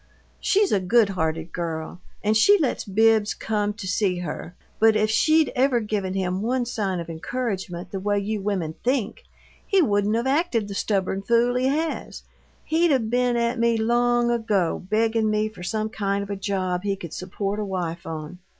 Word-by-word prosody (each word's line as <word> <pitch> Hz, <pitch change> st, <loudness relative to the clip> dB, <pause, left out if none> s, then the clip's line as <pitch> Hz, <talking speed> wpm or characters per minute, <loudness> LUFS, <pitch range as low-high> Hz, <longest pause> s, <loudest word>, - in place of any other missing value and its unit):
She's 405 Hz, 0 st, +2 dB
a 200 Hz, -, +3 dB
good 205 Hz, +3 st, +3 dB
hearted 160 Hz, -3 st, -2 dB
girl, 165 Hz, 0 st, -4 dB, 0.2 s
and 215 Hz, +1 st, +2 dB
she 405 Hz, -, +6 dB
lets 295 Hz, -8 st, -1 dB
Bibbs 220 Hz, +1 st, +3 dB
come 210 Hz, -1 st, -1 dB
to 210 Hz, -2 st, -8 dB
see 185 Hz, -1 st, +1 dB
her, 175 Hz, 0 st, -6 dB, 0.2 s
but 220 Hz, 0 st, +5 dB
if 215 Hz, 0 st, +2 dB
she'd 310 Hz, +7 st, +3 dB
ever 255 Hz, -1 st, +3 dB
given 205 Hz, -4 st, -2 dB
him 185 Hz, 0 st, -1 dB
one 245 Hz, +3 st, 0 dB
sign 200 Hz, -6 st, -2 dB
of 170 Hz, -, -6 dB
encouragement 185 Hz, 0 st, -4 dB
the 195 Hz, -, -3 dB
way 205 Hz, +1 st, 0 dB
you 205 Hz, +1 st, -2 dB
women 190 Hz, -6 st, -2 dB
think, 255 Hz, -, -1 dB, 0.4 s
he 390 Hz, -, +2 dB
wouldn't 205 Hz, -, +2 dB
of 235 Hz, +2 st, 0 dB
acted 265 Hz, -, +1 dB
the 200 Hz, -, -6 dB
stubborn 195 Hz, -1 st, -1 dB
fool 235 Hz, +4 st, +2 dB
he 250 Hz, +1 st, +1 dB
has 310 Hz, +4 st, -2 dB, 0.4 s
he'd 330 Hz, +1 st, +2 dB
'a' 270 Hz, -, +5 dB
been 245 Hz, +1 st, 0 dB
at 235 Hz, +1 st, 0 dB
me 235 Hz, 0 st, +3 dB
long 240 Hz, +1 st, +2 dB
ago, 210 Hz, -8 st, 0 dB
beggin' 220 Hz, +1 st, +2 dB
me 215 Hz, 0 st, +1 dB
for 210 Hz, -4 st, -13 dB
some 215 Hz, +4 st, -2 dB
kind 200 Hz, -2 st, -1 dB
of 200 Hz, -, -7 dB
a -, -, -1 dB
job 190 Hz, -2 st, -2 dB
he 200 Hz, 0 st, -1 dB
could 170 Hz, -4 st, -9 dB
support 195 Hz, +3 st, -3 dB
a -, -, -1 dB
wife 175 Hz, -4 st, -4 dB
on. 160 Hz, +2 st, -6 dB
210 Hz, 185 wpm, -24 LUFS, 190-235 Hz, 0.4 s, she